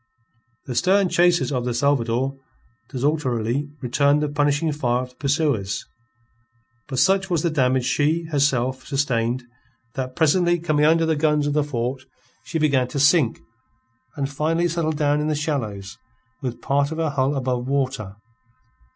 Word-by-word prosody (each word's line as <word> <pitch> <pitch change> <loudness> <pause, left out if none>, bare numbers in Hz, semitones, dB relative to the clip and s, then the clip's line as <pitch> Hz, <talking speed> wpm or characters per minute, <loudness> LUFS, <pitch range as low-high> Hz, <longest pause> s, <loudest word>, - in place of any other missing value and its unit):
The 130 - -5
stern 190 +6 +3
chasers 175 -2 +3
of 125 -3 -1
the 120 -1 -2
Salvador 130 0 0 0.5
desultorily 135 -2 -1
returned 140 +4 +2
the 150 - -1
punishing 145 +2 +1
fire 125 -4 0
of 125 - -9
the - - -27
pursuers; 140 - -1 1.0
but 130 - -5
such 190 +7 +3
was 170 -4 0
the 170 - +1
damage 130 -3 +1
she, 150 +5 +1
herself, 130 -3 +1
sustained, 130 -3 0 0.5
that 130 -1 -4
presently, 175 +2 +3
coming 155 -3 +1
under 165 +1 +4
the 160 -1 +1
guns 150 -1 +1
of 145 - 0
the 150 0 +2
fort, 130 -2 -3 0.4
she 165 - -4
began 140 -5 +2
to 140 - -4
sink, 145 -3 +3 0.7
and 140 -2 -2
finally 160 +5 0
settled 160 -2 -1
down 145 -1 +1
in 150 - -1
the 155 - 0
shallows 115 -10 -4 0.4
with 125 -3 -5
part 140 +1 +1
of 160 - -4
her 160 -2 0
hull 140 0 0
above 125 -2 -2
water. 130 -7 -2
145 Hz, 155 wpm, -22 LUFS, 130-155 Hz, 1.0 s, under